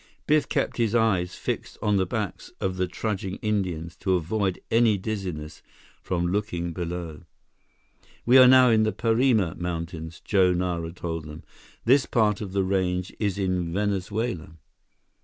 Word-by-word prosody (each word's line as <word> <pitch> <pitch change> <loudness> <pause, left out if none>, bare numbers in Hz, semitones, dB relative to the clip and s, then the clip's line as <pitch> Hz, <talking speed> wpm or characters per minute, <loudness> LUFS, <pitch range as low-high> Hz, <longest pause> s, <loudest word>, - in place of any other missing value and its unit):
Biff 150 -1 +2
kept - - -1
his 115 -2 +1
eyes 95 -6 +2
fixed - - -4
on 105 -1 +1
the 95 -1 +1
backs 105 -2 -4
of 95 -1 -2
the 90 0 0
trudging 95 -3 -3
Indians 90 -6 -2
to 95 -2 +1
avoid 95 +2 -1
any 115 -2 +4
dizziness 95 -7 -5 0.4
from 90 -2 -1
looking 90 -4 -2
below. 85 -2 -5 1.0
"We 125 +2 +7
are 130 - +9
now 130 -1 +7
in 110 -1 +4
the 110 0 +1
Parima 115 -6 +2
Mountains," 85 -1 -5
Joe 95 -3 +3
Nara 85 -2 -2
told 80 -2 -5
them. 75 +1 -10 0.4
"This 130 +3 +4
part 105 -3 +2
of 100 -3 -5
the 100 -1 +1
range 90 -1 -1
is 100 -3 -1
in 90 -3 -1
Venezuela." 100 -2 -2
95 Hz, 150 wpm, -25 LUFS, 85-110 Hz, 1.0 s, are